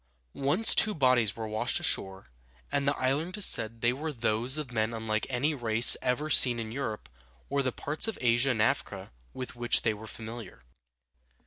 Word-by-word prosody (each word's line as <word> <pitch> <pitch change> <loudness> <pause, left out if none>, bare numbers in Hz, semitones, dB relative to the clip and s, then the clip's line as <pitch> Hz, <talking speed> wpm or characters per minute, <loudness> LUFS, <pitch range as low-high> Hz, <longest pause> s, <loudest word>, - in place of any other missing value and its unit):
Once 150 +11 +2
two 215 -1 +3
bodies 125 -7 +2
were 110 -1 -6
washed 110 0 0
ashore, 95 -9 -1 0.4
and 140 -1 -1
the 140 - 0
islanders 160 +10 0
said 115 0 +2
they 120 +1 +2
were 155 +4 -5
those 120 +1 -1
of 150 -4 -5
men 115 0 -2
unlike 110 -1 -3
any 135 +4 -1
race 115 -3 +4
ever 130 +4 -1
seen 125 -5 +5
in 110 -1 -6
Europe 115 -4 -5 0.4
or 140 0 0
the 130 -1 -2
parts 150 - -2
of 225 - -4
Asia 120 +2 +2
and 110 -4 +1
Africa 105 - -2 0.2
with 130 -1 -8
which 120 0 +2
they 110 - +1
were 110 +1 -11
familiar. 110 - -10
120 Hz, 180 wpm, -28 LUFS, 110-140 Hz, 0.4 s, seen